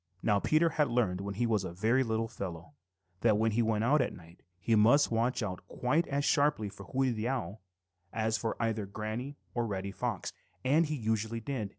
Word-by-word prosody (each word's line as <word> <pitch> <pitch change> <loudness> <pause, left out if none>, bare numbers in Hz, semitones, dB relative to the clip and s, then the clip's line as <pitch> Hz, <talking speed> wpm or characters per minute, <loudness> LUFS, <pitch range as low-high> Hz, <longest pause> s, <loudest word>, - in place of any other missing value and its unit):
Now 105 -2 +3
Peter 155 +9 +3
had 150 -2 +1
learned 110 -7 +1
when 100 0 -4
he 120 +4 +1
was 110 -4 +1
a 95 - -4
very 115 +8 +2
little 115 -1 -1
fellow 85 -7 -7 0.5
that 110 -1 +3
when 110 +1 +2
he 115 +3 +2
went 110 -1 +1
out 140 +5 +4
at 125 - -2
night, 85 +1 -15 0.2
he 115 - 0
must 120 +7 +5
watch 115 +2 +1
out 95 -3 -4
quite 150 - 0
as 140 +1 -1
sharply 145 -8 +2
for 100 -1 -11
Hooty 130 -1 +1
the 110 0 -2
Owl 110 -7 -3 0.5
as 110 0 0
for 110 0 -2
either 110 -3 -1
Granny 110 +7 -5 0.2
or 120 -1 0
Reddy 100 -1 -3
Fox, 115 -3 -3 0.3
and 150 +4 +3
usually 110 -5 -1
he - - -5
did. 130 -8 -2
115 Hz, 205 wpm, -31 LUFS, 105-125 Hz, 0.5 s, must